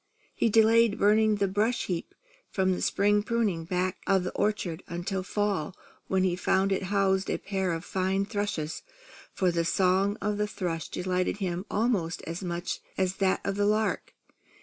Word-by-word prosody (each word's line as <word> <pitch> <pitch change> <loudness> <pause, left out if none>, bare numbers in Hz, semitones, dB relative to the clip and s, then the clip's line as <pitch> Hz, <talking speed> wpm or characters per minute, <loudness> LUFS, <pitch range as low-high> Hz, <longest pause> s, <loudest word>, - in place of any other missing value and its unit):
He 230 - +1
delayed 225 0 +5
burning 215 +1 +4
the 200 -1 +1
brush 210 +5 0
heap 175 -3 -4 0.3
from 190 -1 +1
the 180 - -1
spring 205 +1 +2
pruning, 210 -7 0
back 180 +1 -1
of 190 -2 +3
the 180 - -3
orchard, 190 -5 -1
until 175 +3 -3
fall, 195 -4 -1 0.3
when 190 -1 +1
he 180 -2 +2
found 190 +2 +1
it 195 - +1
housed 195 -1 +2
a - - 0
pair 190 -2 -2
of 165 +2 -4
fine 190 +1 0
thrushes; 200 -7 -3 0.5
for 185 -2 +1
the 170 -1 0
song 190 +4 +2
of 205 +1 -1
the 210 - +1
thrush 170 -6 -3
delighted 185 +1 -1
him 185 -1 -3
almost 205 -7 0
as 170 +4 -5
much 175 0 -3 0.2
as 185 0 0
that 190 -1 +1
of 195 0 -1
the 205 0 +2
lark. 215 +1 0
190 Hz, 170 wpm, -28 LUFS, 180-205 Hz, 0.5 s, delayed